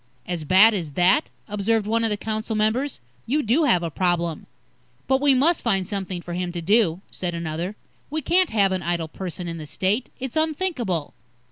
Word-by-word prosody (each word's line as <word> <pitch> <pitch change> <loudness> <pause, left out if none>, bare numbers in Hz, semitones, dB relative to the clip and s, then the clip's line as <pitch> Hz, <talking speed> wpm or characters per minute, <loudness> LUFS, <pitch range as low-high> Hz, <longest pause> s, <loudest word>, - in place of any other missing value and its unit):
"As 175 -3 -3
bad 200 +7 +7
as 165 -8 -3
that?" 185 - +3 0.2
observed 210 +1 0
one 230 +2 +1
of 225 - +2
the 210 - -1
council 220 +1 -3
members. 225 +6 0 0.3
"You 295 +5 +1
do 265 +9 +3
have 180 -11 +3
a 165 - -3
problem." 170 -2 -1 0.6
"But 265 0 +2
we 285 -2 +5
must 310 +6 +3
find 195 -5 +1
something 190 -3 -4
for 175 - -6
him 180 0 -2
to 175 - -3
do," 190 -1 +2
said 175 -2 -3
another. 170 +4 -4 0.3
"We 310 +1 -3
can't 365 +3 +3
have 200 -3 +2
an 185 -1 -1
idle 170 -1 -1
person 180 +1 -6
in 165 -1 -5
the 155 - -8
State. 190 - 0
It's 265 -1 -5
unthinkable." 305 - -1
200 Hz, 195 wpm, -23 LUFS, 175-240 Hz, 0.6 s, bad